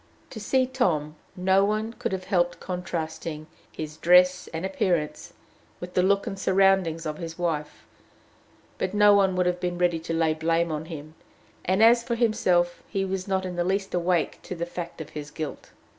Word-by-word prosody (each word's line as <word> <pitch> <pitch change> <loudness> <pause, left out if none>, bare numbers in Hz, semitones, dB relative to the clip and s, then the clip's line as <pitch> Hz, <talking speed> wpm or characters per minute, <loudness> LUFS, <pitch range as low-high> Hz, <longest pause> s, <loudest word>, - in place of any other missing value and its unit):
To 225 - -7
see 260 +5 +2
Tom, 170 - 0 0.2
no 190 +1 +3
one 215 +2 -1
could - - -4
have 190 -1 -3
helped 175 -2 0
contrasting 165 -3 -4 0.3
his 155 -1 -7
dress 180 +2 +4
and 165 +3 -5
appearance 180 -5 -1 0.5
with 180 0 -8
the 180 - +3
look 200 +2 +2
and 195 - -5
surroundings 190 -4 +2
of 155 -1 -4
his 165 -2 -6
wife; 160 -4 -3 0.9
but 185 - -2
no 205 0 +6
one 195 -2 +3
would 180 0 +1
have 180 0 0
been 175 0 -2
ready 175 -2 +1
to 165 +1 -6
lay 165 -1 +2
blame 165 +1 0
on 155 0 -3
him; 155 -2 -8 0.5
and, 190 +4 +3
as 235 +1 +7
for 235 0 -2
himself, 185 -7 +1
he 195 -1 -1
was 190 0 -3
not 190 -1 0
in 180 -1 -5
the 175 - +1
least 195 +2 -1
awake 175 -2 0
to 185 - -7
the 170 0 -3
fact 170 -1 -7
of 160 - -8
his 150 -1 -7
guilt. 155 0 -6
180 Hz, 190 wpm, -26 LUFS, 165-195 Hz, 0.9 s, as